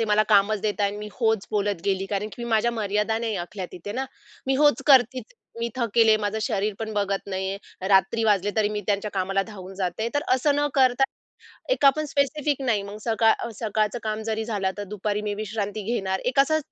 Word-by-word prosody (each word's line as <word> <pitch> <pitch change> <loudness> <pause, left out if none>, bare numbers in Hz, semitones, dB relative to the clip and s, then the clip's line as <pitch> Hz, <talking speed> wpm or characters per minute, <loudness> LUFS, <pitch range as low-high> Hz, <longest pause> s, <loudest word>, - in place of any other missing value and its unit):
ते 225 - +2
मला 210 0 +3
कामच 205 0 +4
देतायेत 205 -1 0
अन् 205 - -7
मी 210 0 -6
होच 220 -4 0
बोलत 205 -4 0
गेली, 195 -1 0
कारण 205 +1 -2
की 240 - -8
मी - - -5
माझ्या 225 +1 +3
मर्यादा 210 0 0
नाही 225 -2 -2
आखल्या 190 -1 -6
तिथे 180 +3 -7
ना. 260 +3 -2 0.4
मी 270 - +2
होच 295 -1 +4
करती 255 -2 +5 0.4
मी 235 - 0
थकलेले, 225 -2 +4
माझं 205 +1 -1
शरीर 210 -4 -1
पण 220 -1 -4
बघत 200 -1 0
नाहीये. 190 0 -3 0.3
रात्री 200 +3 +3
वाजले 205 -2 +2
तरी 215 -1 +3
मी 210 0 -3
त्यांच्या 205 0 0
कामाला 195 0 0
धावून 195 -3 -10
जाते. 190 +4 -2
तर 290 - +1
असं 285 +3 +2
न 290 - +2
करता 260 -1 +4 0.7
एक 395 - 0
आपण 280 +3 +5
स्पेसिफिक 285 0 0
नाही 230 -6 +1
मग 200 +1 -8
सकाळ 225 -1 +4
अ, - - -4
सकाळचं 215 0 0
काम 215 0 -3
जरी 220 0 -2
झालं, 205 -4 -1
आता 205 +2 -5
दुपारी 205 +1 -3
मी 210 -1 -2
विश्रांती 210 0 -4
घेणार. 190 -3 -1
एक 255 +2 +3
असं 315 +3 +3
215 Hz, 210 wpm, -25 LUFS, 200-235 Hz, 0.7 s, करती